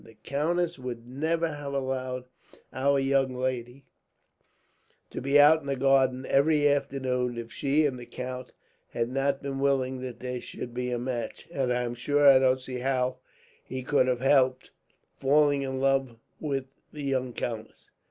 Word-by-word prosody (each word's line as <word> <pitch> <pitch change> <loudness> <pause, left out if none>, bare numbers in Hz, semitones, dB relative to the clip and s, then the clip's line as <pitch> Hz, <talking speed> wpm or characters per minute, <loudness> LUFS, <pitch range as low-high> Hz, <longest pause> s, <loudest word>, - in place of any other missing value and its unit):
"The 115 - -16
countess 170 +4 -1
would 120 -2 -6
never 160 +6 0
have 145 -2 -6
allowed 130 -2 -2 0.5
our 140 +1 +2
young 135 -1 +1
lady 125 +1 -3 1.3
to - - -5
be 140 +3 +4
out 155 +2 +7
in 140 - -11
the 140 - 0
garden, 130 -1 +2
every 145 +1 +3
afternoon, 130 -3 0
if 115 0 -7
she 145 +2 +2
and 130 -3 -1
the 120 - -10
count 125 0 -6 0.4
had 115 0 -1
not 135 +1 0
been 135 -1 -3
willing 130 -2 +1
that 125 -2 -6
there 125 -1 -4
should 120 - -7
be 125 0 -2
a 125 - -1
match; 120 -1 -4
and 135 -6 -1
I 125 0 +1
am 120 0 -3
sure 145 +4 +2
I 135 -1 +9
don't 130 0 +3
see 130 -1 -6
how 130 0 0 0.5
he 130 0 -6
could 130 -1 +2
help 130 -1 +3 0.6
falling 145 +1 +3
in 130 -1 -3
love 135 -2 +1 0.2
with 140 -4 -2 0.3
the 150 -1 -7
young 130 -2 -1
countess." 115 -2 -6
130 Hz, 165 wpm, -28 LUFS, 125-140 Hz, 1.3 s, I